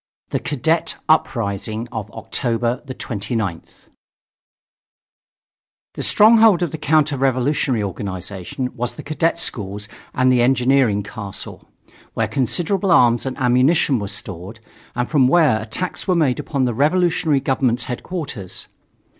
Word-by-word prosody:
THE - - 0
CADET 160 +4 0
UPRISING 115 -7 0
OF 110 -2 -5
OCTOBER 120 +2 -2
29TH 110 -7 -4 2.1
The - - -6
stronghold 220 -4 +5
of 170 - -2
the 160 - -6
counter 150 -2 +2
revolutionary 130 -3 +1
organization 100 +5 -5
was 125 -1 -4
the - - -9
cadet 160 +3 0
schools 105 - -3 0.3
and 130 0 +3
the 125 -1 +3
Engineering 125 -4 +3
Castle, 100 -1 -8 0.5
where - - 0
considerable 175 - 0
arms 120 -7 +4
and 130 - -4
ammunition 130 +2 +3
were 100 - -4
stored, 100 +1 -6 0.4
and 120 0 -1
from 140 -5 +3
where 145 -7 +3
attacks 120 - -4
were 185 - +2
made 145 -7 +1
upon 135 -3 -1
the 120 - 0
revolutionary 160 +2 +2
government's 130 -3 0
headquarters. 130 - -5
125 Hz, 120 wpm, -20 LUFS, 110-155 Hz, 2.1 s, stronghold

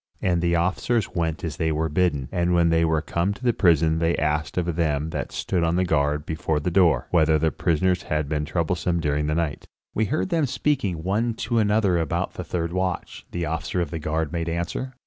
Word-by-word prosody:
And 85 -2 +1
the 85 0 +2
officers 95 +6 0
went 80 -2 -2
as 80 -3 -4
they 80 -1 0
were 80 +1 0
bidden, 75 -4 0
and 90 0 +1
when 85 -1 +4
they 80 0 +3
were 80 -1 +1
come 90 +5 -1
to 125 - -14
the 120 -1 +3
prison 80 -4 +3
they 85 +1 +2
asked 75 +1 -1
of 85 -2 0
them 80 -2 0
that - - -4
stood 90 -3 -1
on 85 +1 +1
guard 75 -3 +1
before 80 -1 -1
the 80 +4 -2
door, 85 -8 +4
whether 80 -2 +4
the 80 +1 +1
prisoners 90 +4 +1
had 75 -1 -2
been 75 0 -1
troublesome 85 +2 -1
during 75 -1 0
the 75 - 0
night. 80 -4 -2 0.3
"We 110 - +1
heard 155 - -1
them 165 -5 +1
speaking 100 - -1
one 110 +5 0
to 115 -1 +1
another 105 -4 +2
about 80 - -1
the - - -5
third 85 -1 -3
watch," 90 -1 -3
the 85 -1 -3
officer 80 +3 -2
of 85 -4 -2
the 80 - -3
guard 80 0 -2
made 85 -1 -2
answer. 85 +10 -3
85 Hz, 215 wpm, -24 LUFS, 80-90 Hz, 0.3 s, when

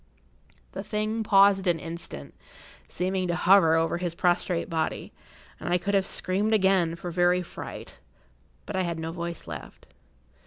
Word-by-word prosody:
The - - -5
thing 215 +1 -2
paused 195 -2 +4
an 175 -2 +3
instant, 165 - -7 0.6
seeming 185 +1 -1
to 175 - 0
hover 175 -2 +5
over 165 +1 +1
his 175 -2 -2
prostrate 175 -1 0
body, 160 -2 -3 0.5
and - - -5
I 175 - +3
could 200 +3 -3
have 195 -1 +2
screamed 205 +4 +1
again 190 -5 +2
for 175 +1 -6
very 180 +1 +2
fright, - - -9 0.7
but 205 - -5
I 190 - +1
had 170 -2 -2
no 160 0 -4
voice 170 -1 -6
left. - - -9
180 Hz, 155 wpm, -26 LUFS, 170-195 Hz, 0.7 s, hover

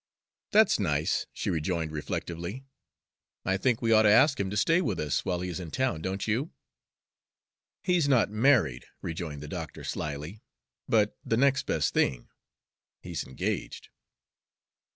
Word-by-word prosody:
"That's 215 - +5
nice," 75 -5 0
she - - -3
rejoined 80 0 -1
reflectively. 85 - -5 0.8
"I 95 - +2
think 120 +4 0
we 115 - +2
ought 110 -1 +7
to 105 - +5
ask 135 +7 +5
him 100 -1 -1
to 105 - -3
stay 165 +11 +3
with - - -1
us 75 -2 -1
while 90 -1 -1
he 90 - -3
is 85 - -5
in 85 -3 -6
town, 115 -7 -1
don't 95 +3 -3
you?" 120 +9 0 1.3
"He's 180 -5 +2
not 120 -6 +3
married," 110 - +2 0.2
rejoined 80 -3 -5
the - - -7
doctor - - -6
slyly, 75 +8 -5 0.5
"but 105 -2 +2
the 115 - 0
next 135 +1 +2
best - - 0
thing 65 -3 0 0.7
he's 85 -5 -5
engaged." 65 - -4
95 Hz, 150 wpm, -28 LUFS, 80-120 Hz, 1.3 s, ought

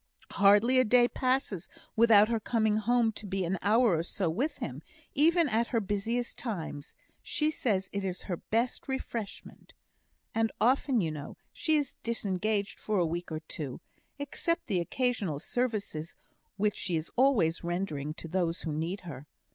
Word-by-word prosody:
"Hardly 205 +6 +5
a - - +6
day 245 +1 +5
passes 255 -9 -1 0.3
without 220 -2 +7
her 230 0 0
coming 220 -1 +1
home 230 +1 +2
to 210 -1 -8
be 190 -1 -1
an 180 +2 -1
hour 220 -1 +4
or - - +1
so 175 0 -1
with 260 - -1
him, - - -5 0.3
even 330 +3 +4
at 235 -1 +1
her 230 - +1
busiest 220 +4 -2
times; 165 - -5 0.3
she 305 0 0
says 200 -10 0
it 200 0 -2
is 185 -1 -3
her 175 - -3
best 235 +9 -1
refreshment. 235 -5 -6 0.6
And 225 0 +1
often, 255 0 +3
you 160 -3 -1
know, 150 -1 -7 0.2
she 315 - +1
is 290 -3 -1
disengaged 210 -2 -1
for 215 -1 -1
a 175 - +3
week 170 +1 -4
or 155 0 -3
two, 150 -3 -6 0.4
except 335 +4 -2
the 195 -6 0
occasional 215 - -1
services 205 - -2 0.4
which 210 0 +1
she 180 -3 -1
is 160 0 -3
always 235 -12 +3
rendering 160 -4 -2
to 165 - -8
those 170 0 -1
who 160 - -2
need 165 +6 -2
her. 145 -5 -9
210 Hz, 165 wpm, -30 LUFS, 175-240 Hz, 0.6 s, without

